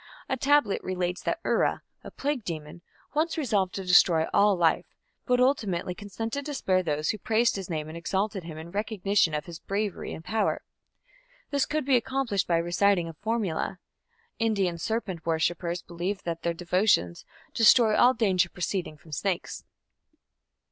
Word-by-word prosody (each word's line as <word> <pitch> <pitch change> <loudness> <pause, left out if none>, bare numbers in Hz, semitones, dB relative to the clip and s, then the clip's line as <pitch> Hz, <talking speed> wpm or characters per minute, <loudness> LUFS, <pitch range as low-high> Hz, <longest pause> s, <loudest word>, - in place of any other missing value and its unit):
A - - 0
tablet 270 -5 +2
relates 180 -1 -2
that - - -2
Ura, - - +1 0.2
a - - -8
plague 280 -4 -2
demon, 155 -1 -6 0.3
once 320 +2 0
resolved 210 - 0
to 195 - -4
destroy 175 -2 +5
all 205 0 +5
life, 170 -2 +2 0.4
but 250 -1 +3
ultimately 215 -9 +1
consented 225 +7 -5
to 295 - -4
spare 185 -7 +1
those 150 -3 -1
who 215 - -7
praised 230 +1 +2
his 195 -2 -5
name 155 -2 -3
and 155 - -8
exalted 190 +3 -2
him 160 -2 -8
in 160 +2 -9
recognition 200 -4 +1
of 150 - -3
his 170 -2 -9
bravery 200 0 -3
and 160 - -8
power. 220 +1 0 0.9
This 280 -2 +1
could 305 -2 -1
be 265 -2 +4
accomplished 245 -5 -1
by 170 - +3
reciting 175 +1 +2
a - - -8
formula. 200 -2 -2 0.6
Indian 200 -7 0
serpent 195 -4 -3
worshippers 170 +1 -1
believe 180 +4 -4
that 165 -1 -4
their 170 0 -1
devotions 175 - +1 0.3
"destroy 225 -1 +6
all 255 +1 +5
danger 190 -6 +2
proceeding 180 -3 -3
from 155 +2 -17
snakes". 175 +5 -3
190 Hz, 160 wpm, -27 LUFS, 170-225 Hz, 0.9 s, destroy